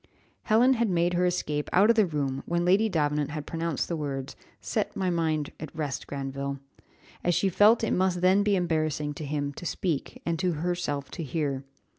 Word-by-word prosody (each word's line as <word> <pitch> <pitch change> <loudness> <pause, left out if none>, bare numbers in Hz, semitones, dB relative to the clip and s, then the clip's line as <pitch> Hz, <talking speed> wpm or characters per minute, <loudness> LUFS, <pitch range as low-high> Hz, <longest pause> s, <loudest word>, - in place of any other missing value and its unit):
Helen 240 +4 +5
had 235 -3 +1
made 175 0 +2
her 180 +1 +2
escape 150 -4 -1
out 205 +5 +6
of - - +1
the 215 -3 +4
room 140 -4 -2
when 170 0 0
Lady 200 +5 +4
Davenant 150 -4 0
had 150 -1 -5
pronounced 165 -3 -2
the 170 - -2
words, 140 -3 -4 0.2
"Set - - -2
my 185 -2 0
mind 160 -3 0
at 155 - -6
rest, 150 -4 -3
Granville," 140 0 -4 0.7
as 175 -1 +2
she 195 - +2
felt 210 +5 +5
it 225 - +1
must 185 -1 +1
then 185 +2 +5
be 205 -1 +2
embarrassing 155 -4 0
to 150 - -7
him 145 0 -2
to - - -10
speak, 170 -3 -2
and 170 -1 -1
to 185 -2 +1
herself 155 -3 -2
to 175 - -6
hear. 140 -2 -2
165 Hz, 195 wpm, -27 LUFS, 145-185 Hz, 0.7 s, out